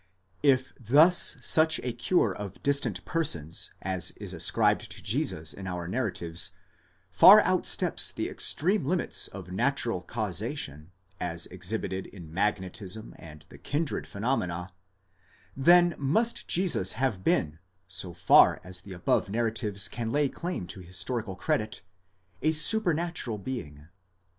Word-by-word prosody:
If 130 Hz, -3 st, +2 dB
thus 150 Hz, -, +5 dB
such 160 Hz, 0 st, +5 dB
a 125 Hz, -1 st, -3 dB
cure 150 Hz, +10 st, +1 dB
of 100 Hz, -2 st, -9 dB
distant 140 Hz, 0 st, +1 dB
persons 85 Hz, -, -1 dB
as 90 Hz, -2 st, 0 dB
is 100 Hz, -3 st, -7 dB
ascribed 80 Hz, -, +2 dB
to -, -, -8 dB
Jesus 80 Hz, 0 st, -2 dB
in 95 Hz, -1 st, -9 dB
our 90 Hz, -2 st, -5 dB
narratives, 90 Hz, -6 st, -2 dB, 0.6 s
far -, -, +9 dB
outsteps -, -, +2 dB
the -, -, -4 dB
extreme 190 Hz, +5 st, +2 dB
limits 175 Hz, +6 st, 0 dB
of 90 Hz, -, -10 dB
natural 120 Hz, -1 st, -1 dB
causation, 95 Hz, -, -4 dB, 0.3 s
as 85 Hz, -1 st, -3 dB
exhibited 95 Hz, 0 st, -4 dB
in 85 Hz, -5 st, -13 dB
magnetism 100 Hz, +2 st, -3 dB
and 75 Hz, -2 st, -13 dB
the -, -, -14 dB
kindred 150 Hz, +2 st, -3 dB
phenomena; 90 Hz, -6 st, -3 dB, 0.8 s
then 175 Hz, +5 st, +5 dB
must 220 Hz, -, 0 dB
Jesus 170 Hz, -, +2 dB
have 115 Hz, -6 st, -2 dB
been, 80 Hz, -3 st, 0 dB, 0.3 s
so 90 Hz, -1 st, -4 dB
far 85 Hz, 0 st, +5 dB
as 90 Hz, 0 st, -4 dB
the 95 Hz, -1 st, -11 dB
above 90 Hz, +3 st, 0 dB
nar 115 Hz, +2 st, -1 dB
ratives 105 Hz, -3 st, 0 dB
can 115 Hz, +1 st, -5 dB
lay 145 Hz, +1 st, +1 dB
claim 170 Hz, -, -5 dB
to 85 Hz, +3 st, -6 dB
historical 95 Hz, +4 st, -3 dB
credit, 105 Hz, +3 st, -2 dB, 0.6 s
a 155 Hz, +1 st, +2 dB
supernatural 165 Hz, -, +1 dB
being. 80 Hz, -, -7 dB
105 Hz, 130 wpm, -27 LUFS, 90-140 Hz, 0.8 s, far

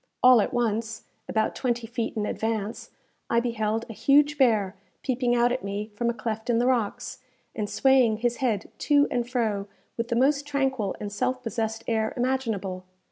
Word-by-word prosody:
All 250 Hz, -2 st, +8 dB
at -, -, -1 dB
once, 225 Hz, -2 st, -1 dB, 0.3 s
about 220 Hz, -1 st, +1 dB
twenty 240 Hz, -2 st, -1 dB
feet 230 Hz, 0 st, -4 dB
in 210 Hz, -, 0 dB
advance, 220 Hz, -1 st, -3 dB, 0.4 s
I 235 Hz, -, +3 dB
beheld 225 Hz, -2 st, -1 dB
a 225 Hz, -, -7 dB
huge 290 Hz, +5 st, +4 dB
bear 215 Hz, -8 st, +2 dB, 0.3 s
peeping 250 Hz, -2 st, +1 dB
out 240 Hz, 0 st, +3 dB
at 255 Hz, +1 st, -2 dB
me 200 Hz, +2 st, -4 dB
from 235 Hz, +3 st, -1 dB
a -, -, 0 dB
cleft 220 Hz, 0 st, -4 dB
in 235 Hz, -, +3 dB
the 240 Hz, -, +2 dB
rocks, 255 Hz, +1 st, -1 dB, 0.4 s
and 210 Hz, -3 st, -3 dB
swaying 260 Hz, -5 st, +4 dB
his 240 Hz, +1 st, 0 dB
head 225 Hz, -7 st, -1 dB
to 290 Hz, -1 st, +4 dB
and 240 Hz, -1 st, -1 dB
fro 215 Hz, -5 st, -1 dB, 0.3 s
with 230 Hz, 0 st, -2 dB
the 235 Hz, -, -1 dB
most 280 Hz, +3 st, +2 dB
tranquil 265 Hz, -8 st, -1 dB
and 205 Hz, -1 st, -5 dB
self 255 Hz, +4 st, -1 dB
possessed 225 Hz, -1 st, -3 dB
air 220 Hz, -1 st, 0 dB
imaginable. 225 Hz, -8 st, -1 dB
235 Hz, 180 wpm, -26 LUFS, 220-255 Hz, 0.4 s, All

